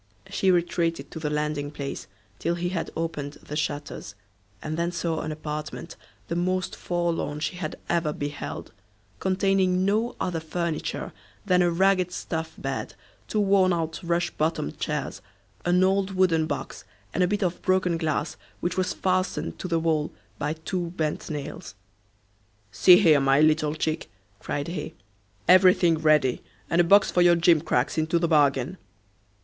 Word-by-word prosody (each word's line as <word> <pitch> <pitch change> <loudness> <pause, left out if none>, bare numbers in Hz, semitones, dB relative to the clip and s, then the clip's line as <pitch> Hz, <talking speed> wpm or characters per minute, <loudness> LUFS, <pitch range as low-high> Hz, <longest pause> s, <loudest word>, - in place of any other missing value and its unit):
She 195 -1 +1
retreated 170 -2 0
to 160 - -6
the 155 -2 -2
landing 150 -1 -1
place 140 -1 -6 0.3
till 170 +2 0
he 175 +1 -2
had 175 -3 -3
opened 150 -3 -3
the 150 - -9
shutters, 145 -8 -4 0.4
and 155 0 -4
then 170 +1 -1
saw 170 -2 -2
an 155 - -4
apartment 155 +2 -6 0.3
the 170 - -2
most 185 +1 -1
forlorn 170 -4 -2
she 165 +4 -3
had 155 -4 -4
ever 170 -3 +1
beheld, 145 0 -5 0.5
containing 190 -1 +2
no 220 +4 +1
other 175 -3 -1
furniture 160 0 -3 0.3
than 180 -2 +4
a 175 - +4
ragged 185 +1 +2
stuff 160 -2 -4
bed, - - -4 0.3
two 215 - -1
worn 195 -2 +4
out 165 -2 -2
rush 170 0 0
bottomed 155 - -2
chairs, - - -3 0.4
an 180 +1 +4
old 195 0 +1
wooden 165 -4 +3
box, 140 -4 -5 0.3
and 185 - 0
a 180 - +4
bit 205 +2 0
of 180 -1 -1
broken 185 -2 +2
glass 160 -2 -2 0.2
which 180 +1 -2
was 185 0 0
fastened 185 0 -1
to - - -4
the 170 -2 +1
wall 160 -2 0 0.3
by 150 +1 -1
two 170 +2 -3
bent 155 -1 -2
nails. 145 -7 -6 1.0
"See 180 - +7
here, 160 -7 +5
my 135 0 +3
little 155 0 +3
chick," 155 0 -2 0.3
cried 145 - -3
he, 170 -3 -5 0.5
"everything 180 -3 +6
ready! 150 -5 +3 0.3
and 170 - +5
a - - +4
box 195 +3 +5
for 180 - +3
your 175 0 +6
gimcracks 165 -5 +2
into 160 +2 +1
the 170 0 +1
bargain." 145 +1 +2
170 Hz, 155 wpm, -26 LUFS, 155-180 Hz, 1.0 s, See